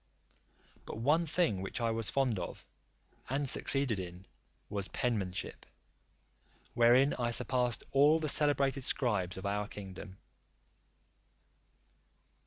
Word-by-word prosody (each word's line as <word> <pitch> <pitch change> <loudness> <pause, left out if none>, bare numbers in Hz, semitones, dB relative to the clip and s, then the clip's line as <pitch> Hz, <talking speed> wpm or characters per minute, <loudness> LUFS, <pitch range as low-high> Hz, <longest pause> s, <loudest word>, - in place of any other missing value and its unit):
But - - -6
one 150 +9 +2
thing 150 - 0
which 95 +5 -5
I 115 -1 0
was 115 -1 0
fond 130 -7 0
of, 85 - -7 0.6
and 140 +2 -1
succeeded 135 -4 +2
in, 90 0 -8 0.4
was 100 -2 -3
penmanship; 105 -8 -3 1.1
wherein 125 +4 +4
I 120 -1 0
surpassed 125 0 0
all 145 +3 +5
the 155 - -2
celebrated 140 -2 +2
scribes 105 -10 -1
of 95 - -7
our 105 +1 -1
kingdom. 95 -1 -9
120 Hz, 110 wpm, -32 LUFS, 100-135 Hz, 1.1 s, all